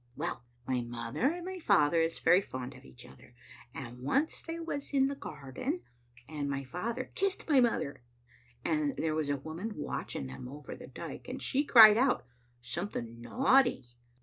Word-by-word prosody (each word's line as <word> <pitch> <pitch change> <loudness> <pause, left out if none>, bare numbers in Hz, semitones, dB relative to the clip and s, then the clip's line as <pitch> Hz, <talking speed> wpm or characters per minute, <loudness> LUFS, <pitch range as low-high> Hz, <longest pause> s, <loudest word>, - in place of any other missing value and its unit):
Well, 160 -4 -3 0.2
my 130 -1 0
mother 120 - -1
and 345 +2 -5
my 375 0 -5
father 165 - +4
is 165 0 0
very 180 - +5
fond 130 -8 -6
of - - -15
each 65 -1 -13
other, 65 - -16 0.4
and 125 -2 -8
once 270 - 0
they 330 0 -5
was 285 -3 -4
in 270 0 +4
the 280 - -3
garden, 260 - -5 0.4
and 145 -2 -3
my 140 -1 -2
father 230 - -4
kissed 390 0 -1
my 290 -4 +5
mother, 225 - +1 0.6
and 300 -3 0
there 160 -1 0
was 155 -2 -1
a 145 - +1
woman 160 +10 -5
watching 145 - -4
them 65 - -8
over 145 +3 -8
the - - -11
dike, - - -8
and - - -5
she 280 +1 +1
cried 220 -6 +9
out 255 0 +2 0.2
— 120 0 -37
something 120 - -5
naughty. 250 - +3
165 Hz, 175 wpm, -31 LUFS, -, 0.6 s, cried